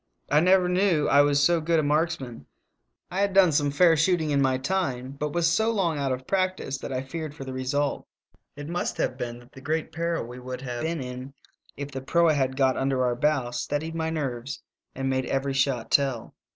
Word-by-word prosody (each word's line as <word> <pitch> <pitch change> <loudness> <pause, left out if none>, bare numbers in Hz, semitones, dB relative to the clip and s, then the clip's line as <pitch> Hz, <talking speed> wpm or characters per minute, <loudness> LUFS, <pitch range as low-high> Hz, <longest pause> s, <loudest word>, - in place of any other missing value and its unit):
I - - +6
never 180 +2 +4
knew 180 -4 +2
I 140 - +6
was 145 0 +3
so 170 +2 +3
good 165 +1 +2
a - - +1
marksman; 145 - -1 0.6
I 190 +2 -1
had 200 -1 0
done 190 -4 +6
some 145 -1 +2
fair 165 +3 +5
shooting 160 -1 +2
in 140 -1 +2
my 130 -1 +2
time, 130 -4 -2
but 145 +2 -4
was. 170 +1 +1
so 220 +7 +2
long 180 -9 0
out 135 -1 0
of 130 0 -3
practice 185 -7 -1
that - - -6
I 130 0 -2
feared 155 +2 -6
for 140 - -7
the 130 - -6
result. 135 +2 -1 0.5
It 145 0 -7
must 175 +2 -2
have 125 - -1
been 120 -2 -5
that 120 +2 -17
the 135 - -13
great 155 +4 -2
peril 170 -3 -2
we 125 +2 -9
would 125 0 -6
have 120 -2 -5
been 165 -2 -2
in 125 +2 -7 0.4
if 140 0 -5
the 135 -1 -5
proa 165 +4 +3
had 130 -2 0
got 130 -2 +3
under 135 -1 +1
our 120 -1 +1
bow 135 -2 +1
steadied 145 +6 -3
my 160 -1 -2
nerves 135 -5 -4 0.3
and 135 0 -2
made 130 -1 0
every 135 0 -1
shot 135 -4 0
tell. 135 -5 +1
145 Hz, 215 wpm, -26 LUFS, 130-165 Hz, 0.6 s, I